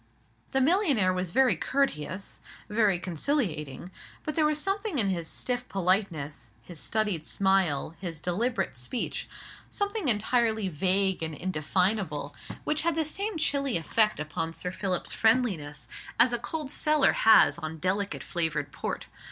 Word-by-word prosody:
The 265 - +1
millionaire 280 - +3
was 180 -1 -2
very 260 +8 +4
courteous, 195 - -2 0.3
very 210 -3 +3
conciliating: 175 - -2 0.3
but 305 - -3
there 310 -1 +3
was 300 0 0
something 390 0 -1
in 205 -6 +3
his 170 -3 -2
stiff 250 +7 -3
politeness, 175 - -1
his 165 +5 -10
studied 205 -7 -1
smile, 190 -6 +1
his 170 -4 -5
deliberate 215 - -1
speech, 125 - -3 0.4
something 405 -3 -2
entirely 220 -2 +2
vague 190 +3 +1
and 160 -1 -3
indefinable, 175 -2 -1 0.3
which 305 0 0
had 335 -1 +1
the 320 -1 +1
same 395 +5 -3
chilly 280 - +1
effect 215 +5 +1
upon 160 +2 -3
Sir 180 +2 -4
Philip's 185 -1 -1
friendliness, 195 - +1 0.3
as 245 - +5
a 240 - 0
cold 290 +4 -5
cellar 300 -1 +3
has 220 -5 +6
on 160 0 -5
delicate 195 +5 -1
flavoured 160 -4 -1
port. - - -4
195 Hz, 140 wpm, -28 LUFS, 165-260 Hz, 0.4 s, has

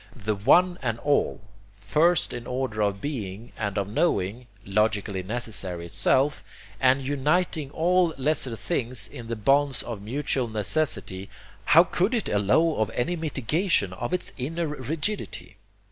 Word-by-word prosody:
The 110 -2 -2
One 175 - +4
and 115 -4 -1
All, 145 -1 +1 0.3
first 150 - +2
in 120 -1 -6
the - - -8
order 125 -4 -2
of 100 -1 0
being 115 -6 -5
and 105 -2 -3
of 100 -2 0
knowing, 115 - 0 0.2
logically 105 -1 0
necessary 95 -5 -5
itself, 135 +11 +1 0.4
and 130 +1 +3
uniting 150 +2 0
all 175 +3 +2
lesser 135 -3 +1
things 120 - -2
in 115 +1 -10
the 115 - -3
bonds 135 +4 +3
of 115 -4 -6
mutual 130 +3 -1
necessity, 105 -3 -2 0.4
how 165 +3 +7
could 185 +6 0
it 225 - -1
allow 105 +11 +2
of 110 -1 +1
any 170 +9 0
mitigation 155 - 0
of 120 +6 -4
its 180 - -2
inner 165 +7 -2
rigidity? 150 - -3
125 Hz, 145 wpm, -26 LUFS, 105-155 Hz, 0.4 s, how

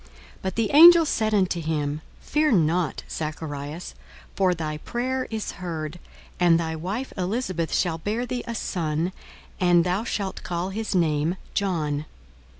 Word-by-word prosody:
42:001:013 - - -23 0.3
But 190 -1 -3
the 225 -2 0
angel 335 +2 +9
said 220 -6 0
unto 185 -3 +1
him, 150 -1 -2 0.2
Fear 300 -2 +2
not, 165 -3 +1
Zacharias: 155 0 -5 0.4
for 185 -2 +2
thy 155 -2 -3
prayer 255 +7 -2
is 220 -2 -3
heard; 165 -2 -4 0.4
and 170 -2 +5
thy 160 -1 -2
wife 195 +11 -4
Elisabeth 185 -3 -2
shall 165 -3 0
bear 215 +8 -2
thee 245 0 -3
a 235 - -3
son, 165 -4 -1 0.5
and 175 -2 +5
thou 180 +4 0
shalt 200 -4 -3
call 175 +1 -3
his 215 0 -3
name 160 -1 +2 0.2
John. 155 -7 -1
180 Hz, 150 wpm, -25 LUFS, 160-215 Hz, 0.5 s, angel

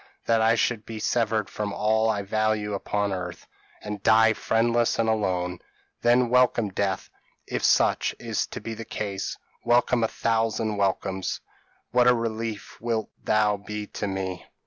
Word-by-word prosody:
that 115 -1 +3
I 115 +1 +4
should 115 -1 0
be 110 +1 -7
severed 110 -1 0
from 105 -1 -4
all 110 +2 +2
I 105 -2 0
value 110 0 0
upon 100 0 -1
earth, 90 -2 -5 0.4
and 105 -1 -5
die 110 +1 +5
friendless 115 +1 +1
and 115 - +1
alone. 90 -5 0 0.4
Then 120 +1 +4
welcome 125 -3 +3
death, 95 0 -2 0.3
if - - -3
such - - +3
is - - -2
to - - -7
be 115 - -5
the 115 - -6
case; 100 -3 -4 0.3
welcome 120 0 +3
a - - +3
thousand 110 -1 0
welcomes! 95 -1 -1 0.5
what 125 +1 +4
a 125 - +6
relief 115 -2 -4
wilt 115 -2 -2
thou 105 -1 +2
be 105 +1 -6
to 105 - -4
me! 95 -2 -3
110 Hz, 155 wpm, -26 LUFS, 100-115 Hz, 0.5 s, a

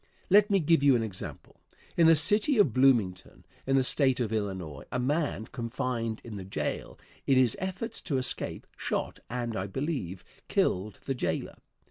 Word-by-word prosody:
Let 205 +2 +6
me 200 -1 +3
give 165 -2 +3
you 140 -2 +5
an 115 - +1
example. 100 -5 -7 0.3
In 165 -1 +5
the 165 - +7
city 210 - +3
of 165 - +4
Bloomington, 120 -8 +2 0.2
in 135 - +2
the 135 - +4
State 130 -1 +3
of 115 -3 -1
Illinois, 95 -9 -3
a - - -1
man 140 -2 -1
confined 115 -2 -3
in 110 -3 -7
the 95 - -6
jail, 75 -6 -4 0.3
in 135 - +4
his 125 -3 +4
efforts 190 +5 -3
to 140 -6 -1
escape, 130 -1 -2
shot - - -3
and, 120 -1 -3
I 95 0 -2
believe, 125 - -4 0.2
killed 95 +2 0
the 135 - -1
jailer. 125 - -3
125 Hz, 170 wpm, -29 LUFS, 110-150 Hz, 0.3 s, the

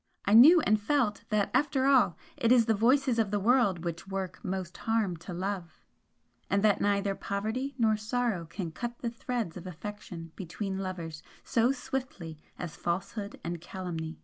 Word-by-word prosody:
I 205 - +2
knew 310 +10 +9
and 215 -4 +2
felt 240 -3 0
that 210 -2 +1
after 270 0 +2
all 255 - +4 0.2
it 230 - +1
is 245 -2 +6
the 225 - +3
voices 250 +3 +3
of 220 -3 +2
the 205 0 0
world 200 -6 +3
which 170 +2 -4
work 190 -2 -4
most 185 -2 -4
harm 225 -5 0
to 170 +3 -9
love 180 -2 -4 0.7
and 200 +1 +2
that 210 -2 +4
neither 200 0 +1
poverty 220 +8 -3
nor 220 -3 +3
sorrow 215 -4 -1
can 170 -1 -5
cut 240 +7 -5
the 235 - -3
threads 230 -7 -3
of 180 - -8
affection 180 -2 -8
between 190 +2 -4
lovers 170 -5 -5 0.2
so 235 +2 +2
swiftly 250 - -5 0.2
as 170 -4 -6
falsehood 195 +4 -3
and 170 0 -4
calumny. 170 -3 -5
200 Hz, 170 wpm, -30 LUFS, 180-235 Hz, 0.7 s, knew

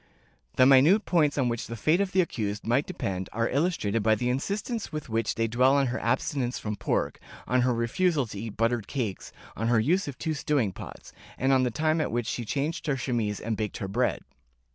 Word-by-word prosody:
The 130 - +6
minute 140 +11 +6
points 150 -5 +2
on 130 -3 +2
which 115 -1 -2
the 115 - -5
fate 155 - +2
of 195 -2 -1
the 185 - +4
accused 105 - -3
might 120 +6 +1
depend 95 - -4
are 115 +1 0
illustrated 135 - 0
by 110 +1 +3
the 125 +2 -1
insistence 200 - -3
with 155 -4 -5
which 115 0 -1
they 115 - +1
dwell 125 +4 +3
on 140 -1 +3
her - - -2
abstinence 125 +1 -1
from 105 -1 -4
pork, - - -1 0.3
on 125 +1 +2
her 125 +1 +2
refusal 140 +6 +1
to 105 -3 -8
eat 110 -1 -6
buttered 115 -2 0
cakes, 115 -9 -4 0.2
on 115 - -2
her 120 -1 +4
use 175 - +1
of 140 - -6
two 160 -1 -2
stewing 140 -7 0
pots, - - -10 0.2
and 135 +1 +2
on 130 - +4
the 125 - +1
time 155 +6 +1
at - - -2
which 120 0 -1
she 120 +1 -3
changed 145 +11 -2
her 140 -2 +1
chemise 115 -5 -1
and 110 0 -2
baked 105 -2 -3
her 95 - -4
bread. 120 +6 0
125 Hz, 220 wpm, -27 LUFS, 115-150 Hz, 0.3 s, The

